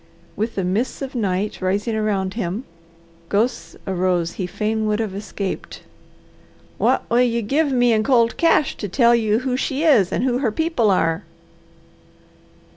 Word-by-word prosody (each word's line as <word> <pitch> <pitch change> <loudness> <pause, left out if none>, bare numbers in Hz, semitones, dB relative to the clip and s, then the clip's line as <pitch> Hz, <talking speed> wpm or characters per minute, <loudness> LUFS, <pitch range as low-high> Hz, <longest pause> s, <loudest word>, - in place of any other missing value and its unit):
With 220 +2 -2
the 195 - -1
mists 210 +10 -1
of 270 - -6
night 205 -4 -2
rising 200 +5 0
around 200 -3 -1
him, 205 +1 -3 0.7
ghosts 225 +5 -1
arose 180 -3 0
he 185 0 -4
fain 215 +3 -1
would 210 0 0
have 215 -4 -2
escaped. 200 -1 -5 1.0
"What - - +1
will 240 +1 +3
you 235 -2 +1
give 285 +7 +1
me 245 -2 +3
in 215 -1 +2
cold 235 -1 +3
cash 325 -4 +2
to 205 - -5
tell 235 +4 +4
you 220 -1 +2
who 255 -1 -1
she 270 +3 -1
is, 245 - +4
and - - -1
who 250 -1 +1
her 245 -5 0
people 315 -4 +1
are?" 165 -3 +1
220 Hz, 160 wpm, -21 LUFS, 195-245 Hz, 1.0 s, tell